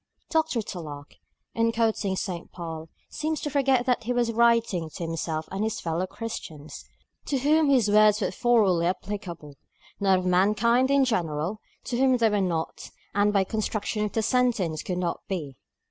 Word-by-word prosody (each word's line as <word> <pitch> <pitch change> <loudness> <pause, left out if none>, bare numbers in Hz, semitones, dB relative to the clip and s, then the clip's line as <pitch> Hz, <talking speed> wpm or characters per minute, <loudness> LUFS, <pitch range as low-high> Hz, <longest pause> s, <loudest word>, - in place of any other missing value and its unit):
Dr. 315 -8 +1
Tulloch, 150 -7 -8 0.4
in 230 0 +2
quoting 220 -4 0
St. 180 -2 -5
Paul, 165 -2 -7 0.2
seems 310 0 -2
to 295 - -3
forget 270 -3 +2
that 250 -3 0
he 245 - 0
was 240 -1 +1
writing 230 -6 +2
of 155 - -10
himself 165 -1 -3
and 195 +2 -2
his 220 -1 -2
fellow 170 +2 -2
Christians, 160 -10 -7 0.4
to 280 - 0
whom 300 +3 +3
his 255 -6 +4
words 210 0 +5
were 210 - -1
thoroughly 210 -9 +3
applicable; 175 -6 -5 0.4
not 195 -2 +3
of 185 - -3
mankind 215 +8 +3
in 280 -1 +4
general, 175 - -1 0.2
to 240 0 -3
whom 260 -1 +4
they 225 -2 +3
were 205 -1 +1
not, 170 -4 -3 0.2
and 205 +1 +3
by 200 -2 +3
the - - -14
construction 215 0 -1
of 210 - -3
the 225 - 0
sentence 225 - +1
could 180 - -3
not 175 -2 -2
be. 155 -9 -4
210 Hz, 175 wpm, -26 LUFS, 175-235 Hz, 0.4 s, words